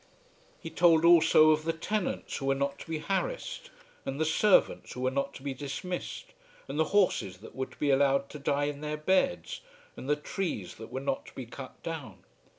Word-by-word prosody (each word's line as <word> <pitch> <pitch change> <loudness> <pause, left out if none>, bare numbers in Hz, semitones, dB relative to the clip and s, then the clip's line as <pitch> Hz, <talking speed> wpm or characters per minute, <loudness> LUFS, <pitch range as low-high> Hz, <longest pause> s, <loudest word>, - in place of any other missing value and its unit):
He 165 - -8
told 165 0 +5
also 165 -2 +7
of 155 0 +2
the 165 +1 0
tenants 195 +4 -2
who 135 - -4
were 135 - +3
not 140 +1 -2
to - - -10
be 160 - -1
harassed, - - -3 0.3
and 135 +2 -4
the 160 - +2
servants 190 +5 +3
who 125 - -6
were 130 0 +1
not 140 +1 -2
to 135 - -10
be 140 -1 -2
dismissed, 180 - -5 0.3
and 150 - -4
the 160 - +4
horses 180 - +1
that 105 - -13
were 130 0 -2
to - - -18
be 145 -1 +1
allowed 140 0 +3
to 150 - -8
die 140 +1 +1
in 145 0 -4
their 150 0 -3
beds, 190 - +1 0.3
and 135 - -7
the 150 - +4
trees 150 - -4
that 110 - -10
were 130 - -3
not 135 0 -2
to - - -14
be 130 - -6
cut 130 +3 -10
down. 150 - -6
150 Hz, 210 wpm, -30 LUFS, 135-170 Hz, 0.3 s, also